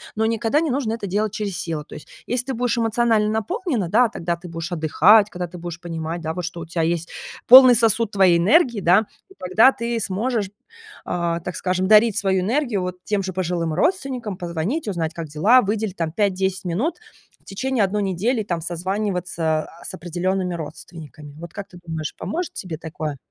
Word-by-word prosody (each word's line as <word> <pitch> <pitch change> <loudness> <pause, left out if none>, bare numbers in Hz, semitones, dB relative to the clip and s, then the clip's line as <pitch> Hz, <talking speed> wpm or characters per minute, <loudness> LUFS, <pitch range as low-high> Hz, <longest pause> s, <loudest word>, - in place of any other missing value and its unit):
Но 220 +1 +1
никогда 230 +6 +1
не 320 - -1
нужно 250 -4 -1
это 225 -3 -5
делать 205 +2 -1
через 205 -4 -3
силу. 160 -3 -3
То - - -14
есть, - - -11 0.2
если 245 0 -1
ты 265 - -2
будешь 245 0 0
эмоционально 225 -2 +2
наполнена, 235 - -2
да, 245 +6 +4
тогда 170 -3 -3
ты 175 - -11
будешь 165 +1 -6
отдыхать, 195 +6 +4
когда 180 -2 -5
ты 175 +1 -11
будешь 170 -1 -7
понимать, 165 0 -5
да, 160 0 -3
вот 180 +1 -5
что 170 0 -6
у - - -6
тя 165 +1 -3
есть 165 +1 -1 0.4
полный 255 0 +10
сосуд 225 -1 +2
твоей 185 -4 +4
энергии, 240 - +3
да, 185 +3 +4
то 385 - -23
тогда 210 +8 +5
ты 235 0 -2
сможешь, 210 +1 -1 0.6
а, 170 -1 -1
так 180 +2 -6
скажем, 185 0 -1
дарить 215 0 +5
свою 190 -2 +1
энергию 235 0 0
вот 180 0 -4
тем 205 -2 -1
же 185 - -3
пожилым 170 -3 -2
родственникам, 255 - -1
позвонить, 175 - -3
узнать, 165 -5 -2
как 165 -1 -6
дела, 200 - +4
выделить 210 -1 -2
там 165 -2 -2
5-10 190 -1 -1
минут 240 - -1 0.4
в - - -35
течение 255 +3 -1
1 205 +2 0
недели, 205 +6 0
там, 175 -4 -3
созваниваться, 175 -3 -2
а, 170 - -16
с - - -6
определёнными 180 +2 -2
родственниками. 155 -2 -10
Вот 170 0 -9
как 200 -1 -7
ты 175 - -14
думаешь, 160 -2 -5
поможет 350 +1 -4
тебе 170 -5 -6
такое? 155 -2 -5
190 Hz, 195 wpm, -22 LUFS, 170-225 Hz, 0.6 s, полный